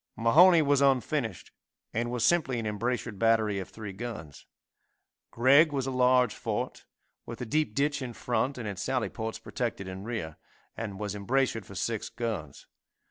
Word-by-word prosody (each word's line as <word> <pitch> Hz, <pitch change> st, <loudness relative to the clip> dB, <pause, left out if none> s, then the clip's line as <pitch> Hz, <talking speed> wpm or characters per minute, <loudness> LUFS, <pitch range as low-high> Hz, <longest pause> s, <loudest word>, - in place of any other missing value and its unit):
Mahone 160 Hz, +8 st, +6 dB
was 140 Hz, -1 st, +3 dB
unfinished, 130 Hz, -, 0 dB, 0.4 s
and 120 Hz, +2 st, -1 dB
was 120 Hz, -1 st, 0 dB
simply 145 Hz, -6 st, +2 dB
an 115 Hz, -, -3 dB
embrasured 110 Hz, 0 st, -2 dB
battery 110 Hz, -3 st, +2 dB
of 95 Hz, -, -6 dB
three 105 Hz, -3 st, -8 dB
guns. 95 Hz, -, -8 dB, 0.8 s
Gregg 140 Hz, +6 st, +5 dB
was 135 Hz, -2 st, -1 dB
a 135 Hz, -, -2 dB
large 125 Hz, -2 st, +3 dB
fort, -, -, -4 dB, 0.4 s
with 115 Hz, -, -7 dB
a 125 Hz, -, -4 dB
deep 150 Hz, -2 st, 0 dB
ditch 145 Hz, 0 st, +1 dB
in 125 Hz, -2 st, -4 dB
front, 125 Hz, +4 st, -1 dB
and 115 Hz, -4 st, -5 dB
its 100 Hz, -2 st, -5 dB
sally 130 Hz, -3 st, -1 dB
ports 110 Hz, -1 st, -5 dB
protected 115 Hz, -6 st, -4 dB
in 95 Hz, +1 st, -7 dB
rear, 105 Hz, -9 st, -5 dB, 0.4 s
and 100 Hz, -4 st, -5 dB
was 105 Hz, -2 st, -3 dB
embrasured 115 Hz, +2 st, 0 dB
for 100 Hz, -, -11 dB
six 110 Hz, +3 st, -2 dB
guns. 110 Hz, -, -5 dB
115 Hz, 165 wpm, -29 LUFS, 105-130 Hz, 0.8 s, Mahone